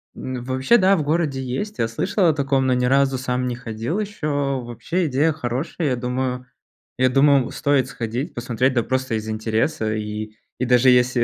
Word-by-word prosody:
н 130 -2 -5
вообще, 130 - +3
да, 195 -2 +4
в 155 - -1
городе 150 -3 0
есть. 130 +12 -4
Я 115 - +2
слышал 175 - 0
о 160 - +4
таком, 135 -2 +1
но 130 - +3
ни 125 0 +1
разу 135 0 +3
сам 125 0 -2
не 120 - -2
ходил 120 - -4
ещё. 145 -9 -2
Вообще 140 +9 -2
идея 145 +4 +2
хорошая. 145 +3 -3
Я 125 - +1
думаю 125 +1 -3 0.5
я 130 0 +3
думал, 135 -1 +4
стоит 140 -3 +1
сходить, 120 +3 -4
посмотреть, 125 +2 0
да, 120 - +2
просто 130 -3 -1
из 110 0 -4
интереса. 110 +2 -1
И, 105 0 -5 0.3
и 125 - 0
даже 125 +1 +5
если, 125 -1 +4
130 Hz, 185 wpm, -22 LUFS, 120-145 Hz, 0.5 s, даже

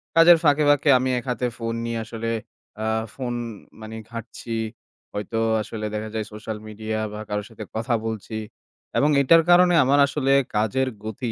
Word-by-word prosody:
কাজের 165 +1 +8
ফাঁকে, 150 0 +4
ফাঁকে 145 0 +4
আমি 130 +1 0
এক 120 - -12
হাতে 125 0 0
ফোন 115 -1 -3
নিয়ে 115 -1 -2
আসলে 115 0 -4 0.5
আ - - -1 0.3
ফোন, 125 -2 -4 0.5
মানে, 110 +1 -8 0.2
ঘাঁটছি। 115 0 -6 0.6
হয়তো 105 +2 -3 0.2
আসলে 110 0 -5
দেখা 110 0 -3
যায় 110 -1 -1
সোশ্যাল 105 0 -5
মিডিয়া 110 +1 -4
বা 105 - -6
কারো 105 0 -2
সাথে 110 -1 -9
কথা 115 +2 0
বলছি। 110 0 -4 0.6
এবং 145 - +4
এটার 165 +4 +6
কারণে 175 0 +6
আমার 140 +2 +3
আসলে 135 -1 +1 0.2
কাজের 110 +5 +1 0.2
গতি 115 +2 -4
115 Hz, 165 wpm, -24 LUFS, 110-135 Hz, 0.6 s, কাজের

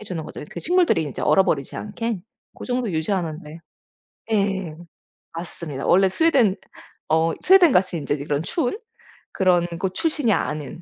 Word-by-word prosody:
해 - - -10
주는 180 -5 -5
거죠. - - -8
그 - - -7
식물들이 350 - +2
이제 145 - -6
얼어 190 - +5
버리지 140 -6 -1
않게. 220 0 -4 0.3
고 - - -9
정도 245 -3 -1
유지하는데 160 -2 -3 0.8
예 195 -5 0 0.6
맞습니다. 165 -4 -6
원래 190 +2 +5
스웨덴 255 - +3 0.5
어 160 +1 +2
스웨덴같이 315 - +5
인제 145 -2 -2
이런 145 0 -2
추운 310 - -1 0.5
그런 180 -2 +2
곳 185 +1 -2
출신이 295 - 0
아닌 150 0 -3
185 Hz, 315 characters per minute, -22 LUFS, 160-230 Hz, 0.8 s, 얼어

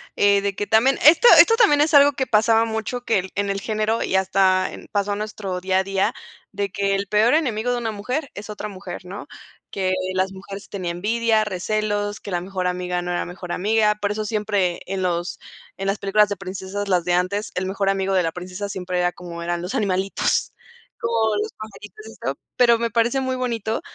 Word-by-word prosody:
eh, 200 0 +4
de 200 -1 -2
que 205 - -2
también 225 +6 +3
esto 330 +10 +8
esto 455 - +7
también 410 -12 +4
es 310 +2 +2
algo 285 0 +7
que 265 0 -1
pasaba 225 -1 +4
mucho 220 +2 -3
que 225 - +2
el 185 +1 -6
en 200 0 -1
el 195 0 -1
género 215 +1 -1
y - - -1
hasta 190 0 +2
en - - -11
pasó 205 0 0
nuestro 205 -3 -4
día 190 0 +1
a 190 - +1
día, 195 0 0 0.4
de 200 0 -2
que 200 +1 0
el 200 0 -2
peor 215 +5 +3
enemigo 245 -6 +1
de 245 - 0
una 230 -2 -2
mujer 250 +8 -4
es 205 +1 -9
otra 210 0 -5
mujer, 185 -2 -8
¿no?, 190 +3 -8 0.4
que 185 -1 -1 0.2
las 190 +1 0
mujeres 195 +1 -10
tiene 185 -4 -4
envidia, 220 +5 +1
recelos, 205 +1 -2
que 200 - -8
la 175 - 0
mejor 185 +1 -4
amiga 180 0 -1
no 175 0 -4
era 175 - -1
la - - -3
mejor 180 0 -8
amiga. 210 +2 +2
Por 205 -1 -2
eso 215 0 -3
siempre 205 -5 -1
en 195 0 -3
los 175 -1 -2 0.4
en 195 0 -4
las 200 +1 0
películas 205 +1 +3
de 205 - -3
princesas, 195 +1 -5
las 180 -3 +2
de 175 - -1
antes, 185 +4 0
el 185 - -1
mejor 195 +1 -1
amigo 195 0 0
de 185 -2 +3
la 165 - -1
princesa 180 +4 -6
siempre 180 -1 -3
era 175 0 +2
como 170 -1 -8
eran 175 0 -2
los 180 +8 -5
animalitos, 195 -4 0 0.5
o 225 -2 +1
los - - -4
pajaritos 215 - -11
y - - -10
esto, - - -5 0.2
pero 235 -2 +5
me 235 0 0
parece 235 +3 +1
muy 260 0 -1
bonito 230 -3 -2
200 Hz, 220 wpm, -22 LUFS, 185-220 Hz, 0.5 s, esto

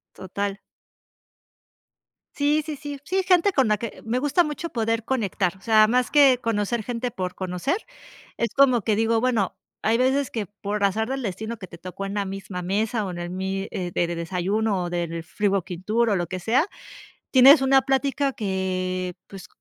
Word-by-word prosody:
Total. 200 +2 -4 1.8
Sí, 295 +2 +2
sí, 310 -1 -4
sí, 290 -1 -7
sí, 375 +4 0
gente 365 +1 +4
con 265 - +2
la 210 0 +2
que, 230 +1 -7
me 235 +3 0
gusta 290 +6 +3
mucho 305 +2 -4
poder 225 -2 -1
conectar, 200 -7 -1
o 190 - -23
sea, 215 -1 +5
más 250 +1 +1
que 275 -4 +6
conocer 225 0 -1
gente 245 +2 -3
por 185 -5 -4
conocer, 185 - -2 0.6
es 235 - 0
como 255 -4 +4
que 215 +1 +1
digo, 225 +1 +2
bueno, 230 -6 0 0.3
hay 225 +1 +2
veces 265 +2 +2
que 220 -3 -3
por 205 +1 -4
azar 220 +4 +1
del 270 -1 -3
destino 220 +3 -4
que 190 -3 -9
te 170 - -12
tocó 185 +2 -6
en 195 - -4
la 200 -1 0
misma 195 -1 -6
mesa 210 +4 -1
o 185 - -4
en 175 - -7
el 175 0 -4
mis 190 +1 -3
de 180 -1 -4
de 175 0 0
desayuno 190 +4 -1
o 175 - -3
del 170 -1 -3
free 205 +4 -1
working 185 -2 -2
tour 230 +4 +2
o - - +3
lo 175 -2 -1
que 185 +3 -5
sea, 245 - +2 0.6
tienes 270 +2 +8
una 270 0 +5
plática 275 +1 0
que, 185 -3 -2
pues, 195 -2 -10
215 Hz, 190 wpm, -24 LUFS, 190-255 Hz, 1.8 s, tienes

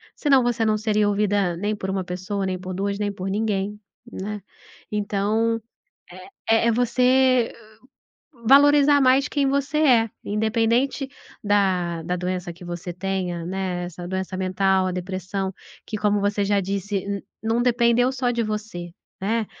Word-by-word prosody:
Senão, 275 -4 +3
você 235 -2 +1
não 215 0 +2
seria 210 -1 +1
ouvida 200 -3 +1
nem 205 +3 -1
por 190 -2 -5
1 190 -1 -1
pessoa, 185 +2 -3
nem 185 -1 -2
por 185 0 -6
2, 200 +2 -2
nem 205 -1 -1
por 190 -1 -6
ninguém, 210 0 -1 0.3
né? 205 0 -5 0.5
Então, 210 +2 0 0.9
é 225 +1 +4
é - - +4
você 250 +1 +3 1.0
valorizar 285 +2 +6
mais 265 +2 +4
quem 285 -2 +1
você 280 +2 0
é, 240 -7 +4
independente 230 +6 +1 0.4
da 185 -5 +1
da 180 +2 -2
doença 180 0 -3
que 175 +1 -13
você 175 0 -5
tenha, 180 -2 -3
né, 185 -1 -3
essa 175 0 -7
doença 190 0 -3
mental, 190 0 +2
a 185 - -1
depressão, 190 +1 -3 0.3
que 215 - -4
como 205 0 +2
você 205 0 0
já 200 0 +2
disse, 200 +1 -3 0.2
não 225 +2 +1
dependeu 245 0 +3
só 250 -2 0
de 235 -1 0
você, 210 -5 -4 0.3
né? 220 +3 0
205 Hz, 150 wpm, -23 LUFS, 190-230 Hz, 1.0 s, valorizar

